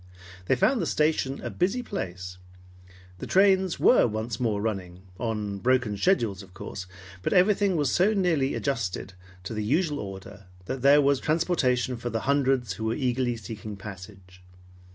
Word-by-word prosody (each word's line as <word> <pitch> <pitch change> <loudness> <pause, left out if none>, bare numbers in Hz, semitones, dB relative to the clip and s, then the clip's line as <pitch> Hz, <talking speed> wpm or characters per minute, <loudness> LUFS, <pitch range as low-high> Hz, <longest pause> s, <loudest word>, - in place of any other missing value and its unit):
They - - +3
found 235 - +2
the 165 - -1
station 150 -3 0
a - - -4
busy 195 +8 0
place. 90 - -6 0.8
The - - -6
trains 190 -2 +3
were 250 - +5
once 110 +1 -4
more 110 -4 0
running, 95 -4 -4 0.2
on 105 -4 -3
broken 125 -2 +1
schedules 105 - +1
of 95 -2 -15
course, 95 -1 -7 0.3
but - - -1
everything 195 0 +3
was 145 -5 +1
so 190 +5 +3
nearly 165 -8 +1
adjusted 100 -8 -3 0.3
to 95 - -5
the 110 -1 -2
usual 150 - 0
order 95 0 -9 0.2
that 130 +6 -4
there 140 +2 +6
was 140 -1 +3
transportation 140 -7 +1
for 120 +1 -4
the 115 -1 -2
hundreds 135 -5 +1
who 110 +4 -5
were 110 - 0
eagerly 125 -3 0
seeking 110 0 -7
passage. 95 -2 -11
120 Hz, 160 wpm, -26 LUFS, 100-150 Hz, 0.8 s, there